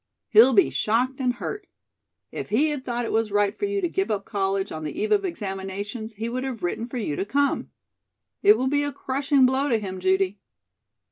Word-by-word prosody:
He'll 235 +4 +7
be 210 - +4
shocked 250 +5 0
and 250 -2 +1
hurt. 410 - -6 0.6
If - - -6
he 280 +9 +3
had 290 -3 -3
thought 240 -1 -2
it - - -3
was 225 -1 0
right 205 +1 +2
for - - -2
you 405 0 -1
to 355 - +1
give 385 +3 -1
up 200 -2 -2
college 195 -1 -1
on 155 0 -5
the 155 - -5
eve 430 +1 -1
of 410 -1 +3
examinations, 205 - -5
he 220 +2 -4
would 250 +2 -3
have 250 -7 -5
written 225 +6 -2
for 250 - -6
you 200 -11 -2
to - - -1
come. 280 +7 0 0.7
It 415 +1 +6
will 260 - -1
be 285 +2 +2
a 290 - -2
crushing 270 +1 +2
blow 265 +3 +1
to 235 - +3
him, 190 -3 -5
Judy." 190 +1 +1
235 Hz, 215 wpm, -25 LUFS, 200-280 Hz, 0.7 s, He'll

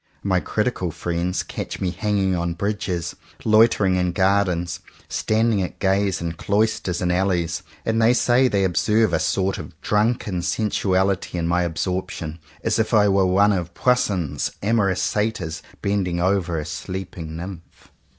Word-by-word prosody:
My 95 -2 +2
critical 105 -3 -1
friends 85 +2 -2
catch - - -6
me 90 - -1
hanging 100 -2 0
on 85 -1 -2
bridges, 100 -2 -2 0.3
loitering 110 -4 +4
in 90 -1 0
gardens, 95 -3 +1 0.3
standing 110 -1 +1
at 90 - -4
gaze 95 -1 +1
in 85 -1 -2
cloisters 100 0 0
and 90 - +1
alleys; 90 -2 0 0.2
and 115 0 +1
they 115 +2 +5
say 125 +2 +4
they 100 -5 +1
observe 105 +2 +2
a 80 - +3
sort 95 0 0
of 80 - -10
drunken 105 -3 0
sensuality 95 -2 0
in 85 -1 -1
my 90 +1 +2
absorbtion, 85 -1 -3 0.2
as 115 - +1
if 110 +1 +1
I 105 -1 +5
were 95 -1 +3
one 100 +3 +4
of 85 -3 -3
Poussin's 100 - +1
amorous 100 -3 +2
Satyrs 105 -7 -1 0.2
bending 95 -4 0
over 90 -2 +1
a 75 - -3
sleeping 85 -2 -6
Nymph. 85 0 -9
95 Hz, 150 wpm, -22 LUFS, 85-105 Hz, 0.3 s, they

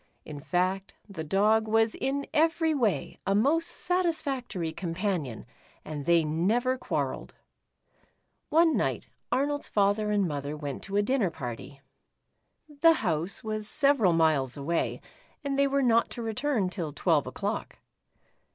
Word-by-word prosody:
In 150 -2 -8
fact, 185 +5 -1
the 190 -6 -6
Dog 210 +7 +2
was 225 0 +2
in 280 +1 -2
every 320 +1 +2
way 235 -9 -1
a 195 - +2
most 305 +10 +2
satisfactory 280 - -1
companion, 170 - -3 0.4
and 150 -2 -6
they 170 -1 +5
never 210 +12 +1
quarrelled. 255 - -3 1.1
One 325 +1 +4
night, - - -1 0.3
Arnold's 290 +2 0
father 205 +1 +1
and 205 -3 +2
mother 145 0 -4
went 145 -3 -5
to 195 +1 -2
a 205 - +3
dinner 235 -4 +1
party. 135 -1 -8 0.9
The 310 +2 +4
house 175 - -2
was 215 -1 -2
several 275 - +4
miles 155 -5 +2
away, 165 +4 -1 0.4
and 280 -1 -1
they 280 - +4
were 275 0 +1
not 235 -2 +3
to 235 - -4
return 225 -3 -1
till 170 -6 -4
twelve 155 -1 +1
o'clock. - - -4
205 Hz, 135 wpm, -28 LUFS, 165-270 Hz, 1.1 s, they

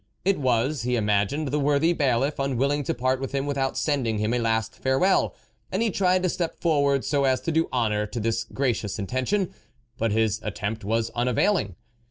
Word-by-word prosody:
It 195 -3 +2
was, 130 +1 +1
he 125 +1 0
imagined, 105 +7 0
the 150 +3 0
worthy 145 +4 +3
bailiff, 140 -1 +1
unwilling 140 +2 0
to - - 0
part 130 +1 0
with 135 +1 -5
him 135 0 0
without 140 -2 -1
send 145 -5 0
ing 110 -1 0
him 105 +2 0
a 125 - +1
last 115 -1 0
farewell, 135 +9 +1 0.4
and 195 +5 0
he 225 - +1
tried 185 -1 +2
to 185 - +2
step 170 -1 -3
forward 140 -5 +2
so 140 -2 +1
as 130 -1 +2
to 165 - -2
do 160 +1 +1
honour 105 -4 0
to 120 - -5
this 115 +1 0
gracious 115 -5 -2
intention, 130 - -1 0.5
but 115 -1 +1
his 110 -1 +1
attempt 105 +1 -4
was 115 +2 0
unavailing. 120 - +1
130 Hz, 195 wpm, -25 LUFS, 115-145 Hz, 0.5 s, worthy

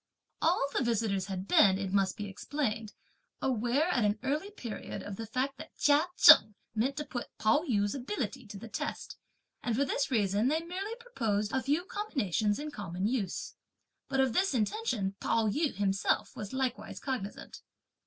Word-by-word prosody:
All 330 -3 +3
the - - +1
visitors 215 -5 0
had 190 -1 -4
been, 190 -3 +6
it 195 -1 -3
must 195 0 +2
be 210 - -4
explained, 220 +1 -3 0.5
aware 250 +5 +1
at 245 -9 +2
an 210 0 +2
early 300 +9 -1
period 245 - -6
of 205 - -6
the 225 +2 -6
fact 265 +4 -2
that - - -10
Chia 295 +3 +4
Cheng 215 - +9 0.2
meant 255 +6 0
to 300 - -3
put 245 -4 -5
Pao 220 +6 +4
yü's 205 -3 +2
ability 260 - -4
to 205 - -8
the 230 - -9
test, - - -4 0.5
and 235 -3 -1
for 280 +4 +2
this 275 0 0
reason 210 -1 +2
they 310 +4 +2
merely 385 +6 -4
proposed 225 - -2
a 265 - +1
few 295 +7 0
combinations 220 - -1
in 300 +1 -5
common 190 -5 -4
use. 215 -5 -2 0.6
But 270 -1 0
of 260 -3 +2
this 380 -3 +2
intention, 220 - 0
Pao 225 -1 +1
yü 295 +7 0
himself 195 -1 0
was 205 -2 -6
likewise 250 -5 -2
cognizant. 240 -7 -5
235 Hz, 175 wpm, -31 LUFS, 205-280 Hz, 0.6 s, Cheng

